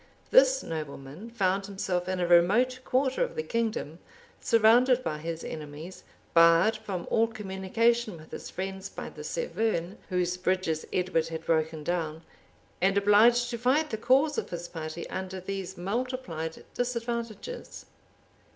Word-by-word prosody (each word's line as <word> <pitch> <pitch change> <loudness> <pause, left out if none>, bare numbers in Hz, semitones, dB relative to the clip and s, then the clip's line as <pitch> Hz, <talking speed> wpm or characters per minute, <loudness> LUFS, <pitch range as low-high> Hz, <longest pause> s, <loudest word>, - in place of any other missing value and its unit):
This - - +6
nobleman 150 +5 -6
found 195 -3 0
himself 185 -2 -2
in 185 -1 -1
a 175 - +1
remote 205 +10 +4
quarter 265 - +1
of - - -4
the 470 - -2
kingdom; 220 - -2 0.4
surrounded 240 +3 +4
by 150 -8 -3
his 165 +1 -5
enemies; 155 +4 -8 0.3
barred 170 +6 +6
from 195 -5 -5
all 225 0 +4
communication 215 +1 0
with 155 0 -15
his - - -7
friends 190 +1 -5
by - - -7
the - - -10
Severn, 220 - -2
whose 180 -1 0
bridges 180 -4 -1
Edward 180 -3 0
had 165 0 -6
broken 160 -1 0
down; 165 -1 -2 0.6
and 195 +2 +3
obliged 230 +5 +5
to 235 - -4
fight 280 +6 +2
the - - 0
cause 270 +6 +3
of - - -6
his 175 0 -5
party 160 0 -6
under 190 0 -5
these 190 0 -5
multiplied 195 -5 -4
disadvantages. 235 - -4
190 Hz, 140 wpm, -28 LUFS, 170-235 Hz, 0.6 s, This